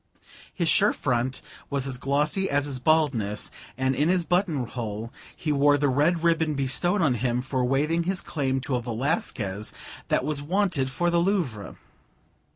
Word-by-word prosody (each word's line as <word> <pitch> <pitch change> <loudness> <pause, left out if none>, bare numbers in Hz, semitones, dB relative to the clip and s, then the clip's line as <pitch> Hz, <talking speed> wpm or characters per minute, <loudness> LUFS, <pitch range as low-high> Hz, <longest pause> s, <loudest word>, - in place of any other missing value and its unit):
His 170 -3 -1
shirt 205 +5 +4
front 130 0 -1 0.3
was 140 -2 -1
as 130 -2 -2
glossy 150 +8 0
as 145 0 +1
his 135 -3 -4
baldness, 125 -9 +1 0.3
and 130 0 +1
in 150 +5 +2
his 180 -2 +2
buttonhole 125 - -2 0.2
he 155 - -2
wore 145 0 +4
the 145 0 +1
red 155 +6 +2
ribbon 165 -2 +2
bestowed 170 +8 +1
on 145 -5 +3
him 120 +1 0
for 130 0 -1
waiving 150 +6 +1
his 190 0 0
claim 135 -4 -1
to 135 - -4
a - - -3
Velasquez 115 - -2 0.4
that - - +1
was 150 -1 -1
wanted 175 -4 0
for 175 +7 0
the 170 - +3
Louvre. 170 - -1
140 Hz, 160 wpm, -26 LUFS, 125-165 Hz, 0.4 s, shirt